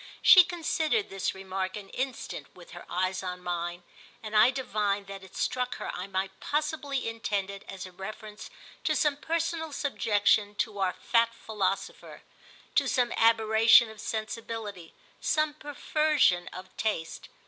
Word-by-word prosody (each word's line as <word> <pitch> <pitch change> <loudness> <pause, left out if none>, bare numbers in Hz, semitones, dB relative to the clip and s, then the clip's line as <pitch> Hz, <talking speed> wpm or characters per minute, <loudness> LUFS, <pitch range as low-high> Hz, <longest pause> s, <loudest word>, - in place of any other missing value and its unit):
She 370 - +10
considered 345 +3 -1
this 195 -1 -2
remark 190 0 -4
an 200 -2 -9
instant 260 0 -4
with - - -14
her - - -10
eyes 185 +1 -1
on 180 -1 -5
mine, 175 0 -3 0.4
and 215 0 -5
I 215 +3 +7
divined 210 -6 -1
that 195 0 -9
it 190 - -14
struck 250 -1 -1
her - - -5
I 180 +2 -5
might 190 0 -3
possibly 295 -3 -2
intend 205 -4 -2
it 200 0 -9
as 190 -1 -7
a 185 - -10
reference 210 +3 -8 0.4
to - - +2
some 295 -2 +2
personal 325 +1 -2
subjection 210 -7 +1
to 205 -1 -2
our 185 -2 +1
fat 230 +5 +1
philosopher, 200 -4 -3 0.5
to - - +3
some 245 -2 +1
aberration 225 0 +5
of 215 -1 -11
sensibility, 220 -5 -5 0.3
some 310 -1 +1
perversion 295 - +1
of 185 +1 -10
taste. 190 -7 -3
215 Hz, 150 wpm, -29 LUFS, 190-265 Hz, 0.5 s, She